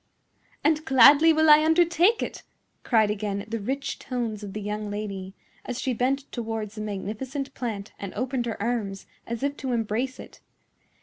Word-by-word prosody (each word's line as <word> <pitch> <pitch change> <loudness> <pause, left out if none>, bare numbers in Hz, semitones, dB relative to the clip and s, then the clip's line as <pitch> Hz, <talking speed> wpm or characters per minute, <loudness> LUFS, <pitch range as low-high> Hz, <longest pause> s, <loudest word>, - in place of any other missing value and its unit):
"And 310 +1 +2
gladly 280 +3 +7
will 315 0 +3
I 300 0 +8
undertake 345 +6 +3
it," - - -6 0.4
cried 220 -4 +3
again 200 -1 -3
the 230 +1 -3
rich 265 +7 -3
tones 235 -4 -3
of 200 -2 -7
the 215 - -4
young 210 0 -4
lady, 200 -2 -5 0.3
as 250 -1 -5
she 260 - -1
bent 260 +4 +1
towards 225 -3 -4
the 215 - -6
magnificent 225 +7 -4
plant 215 -5 -5
and 200 -2 -5
opened 250 +1 -2
her 225 - -4
arms 205 -3 -2 0.2
as 235 +2 -4
if 285 0 0
to 260 -2 -3
embrace 235 +3 -1
it. - - -12
235 Hz, 170 wpm, -26 LUFS, 210-275 Hz, 0.4 s, I